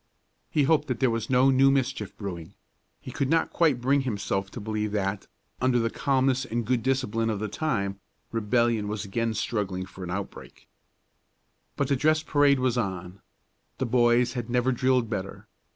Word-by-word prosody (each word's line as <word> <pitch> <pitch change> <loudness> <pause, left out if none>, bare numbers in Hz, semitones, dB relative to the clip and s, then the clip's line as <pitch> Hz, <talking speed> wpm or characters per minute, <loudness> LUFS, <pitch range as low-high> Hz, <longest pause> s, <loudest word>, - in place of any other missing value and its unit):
He 150 - +2
hoped 150 +1 +2
that 125 -4 -2
there 130 -1 +3
was 115 -1 -3
no 130 +1 +4
new 135 +1 +5
mischief 120 -7 -1
brewing; 90 -6 -7 0.4
he - - -9
could 140 -2 -1
not 165 +1 +1
quite 155 -7 +3
bring 135 +3 +2
himself 100 -5 -2
to 120 - -8
believe 105 0 -2
that, 95 -1 -2 0.3
under 130 -1 +3
the 115 -1 0
calmness 135 -1 +1
and 120 -2 -3
good 125 +1 +1
discipline 115 -3 0
of 110 - -1
the 110 - -2
time, 100 -8 -2 0.3
rebellion 115 -1 +1
was 105 0 -3
again 115 +3 -1
struggling 95 -4 -2
for 95 0 -11
an 90 - -6
outbreak. 100 +2 -7 1.1
But 140 - 0
the 140 - +2
dress 155 +3 +2
parade 145 -2 +3
was 125 -1 +1
on. 95 -3 -4 0.6
The 130 - -1
boys 120 0 +3
had 120 -2 -4
never 125 +1 +2
drilled 130 -1 +2
better. 100 -3 -5
120 Hz, 175 wpm, -26 LUFS, 105-130 Hz, 1.1 s, new